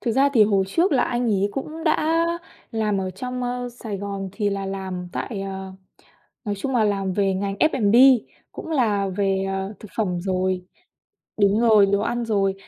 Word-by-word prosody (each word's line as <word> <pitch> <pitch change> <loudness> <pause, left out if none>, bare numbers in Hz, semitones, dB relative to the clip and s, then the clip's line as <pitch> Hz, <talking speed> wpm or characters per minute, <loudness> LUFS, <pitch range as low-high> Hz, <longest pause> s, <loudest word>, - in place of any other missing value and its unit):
Thực 235 - -1
ra 275 +4 +4
thì 220 - +7
hồi 200 -2 +2
trước 335 - +2
là 255 - +3
anh 245 0 -1
ấy 200 -2 +1
cũng 315 +4 -5
đã 325 +1 +2 0.5
làm 215 -3 0
ở 185 -1 -3
trong, 250 +6 -5
ơ, 245 0 -3
Sài 230 -4 -6
Gòn 200 -1 -4
thì 205 -1 -1
là 195 -1 -3
làm 190 -2 -5
tại 215 -6 -4
ờ, 190 -1 -6 0.7
nói 205 -2 -2
chung 265 +7 -3
là 220 - +3
làm 195 -2 0
về 195 0 +1
ngành 195 +1 -2
F&B 235 -7 +3 0.6
cũng - - -8
là 210 -9 +1
về, 195 0 0
ờ, 195 +2 -3
thực 215 - -11
phẩm 180 -6 -1
rồi 185 -1 -1 0.8
đúng 205 +2 +4
rồi, 215 -4 +6
đồ 200 0 +1
ăn 240 +2 -1
rồi, 195 -3 +1
205 Hz, 190 wpm, -23 LUFS, 195-240 Hz, 0.8 s, thì